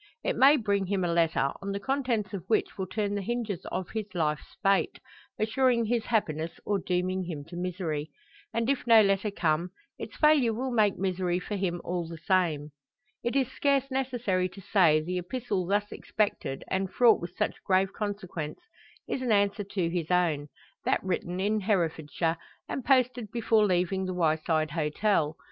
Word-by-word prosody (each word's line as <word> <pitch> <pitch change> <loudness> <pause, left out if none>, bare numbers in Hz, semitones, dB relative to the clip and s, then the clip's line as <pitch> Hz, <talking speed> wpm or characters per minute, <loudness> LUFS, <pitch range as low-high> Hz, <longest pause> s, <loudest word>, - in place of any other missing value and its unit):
It - - 0
may 275 +5 +7
bring 200 -4 0
him 195 -1 0
a 170 - 0
letter, 165 -5 +2
on 200 0 -3
the 200 - -2
contents 240 -5 -1
of 190 -4 -4
which 220 - +1
will 190 -1 -4
turn 205 +2 -2
the 205 - -1
hinges 225 -3 -3
of 185 - -4
his 220 -2 -3
life's 150 -3 -2
fate, 195 -1 +2 0.4
assuring 235 +1 +2
his 230 0 0
happiness 165 -8 -1
or 205 -1 +1
dooming 185 +1 -1
him 155 -5 -6
to 175 - -9
misery. 175 -4 -3 0.4
And 230 0 -1
if 270 -2 0
no 225 -2 +8
letter 195 +1 +1
come, 170 -3 0 0.3
its - - -7
failure 290 -7 +4
will 260 +3 -2
make 215 -4 +3
misery 180 -1 0
for 205 +3 -5
him 175 -3 -2
all 175 -1 -3
the 165 0 -8
same. 160 -4 0 0.5
It 240 +2 -1
is 265 -2 +1
scarce 275 -1 +1
necessary 245 -9 0
to 185 +2 -12
say, 165 -6 +5
the 180 +3 -2
epistle 195 -1 -3
thus 205 +2 0
expected, 205 -10 -2
and 190 0 0
fraught 235 -3 +5
with 175 +1 -7
such - - -2
grave 190 0 +2
consequence, 200 - -4 0.5
is 260 - -2
an 250 -3 0
answer 205 0 +2
to 190 -3 -2
his 170 -2 -2
own; 165 -5 +1 0.4
that - - +1
written 180 -1 -2
in 210 +3 +1
Herefordshire, 165 -4 0 0.3
and 265 - -4
posted 250 -4 +2
before 225 -2 +3
leaving 185 +1 +1
the 185 -1 -3
Wyeside 160 -2 +1
Hotel. 160 +1 0
190 Hz, 175 wpm, -28 LUFS, 175-220 Hz, 0.5 s, no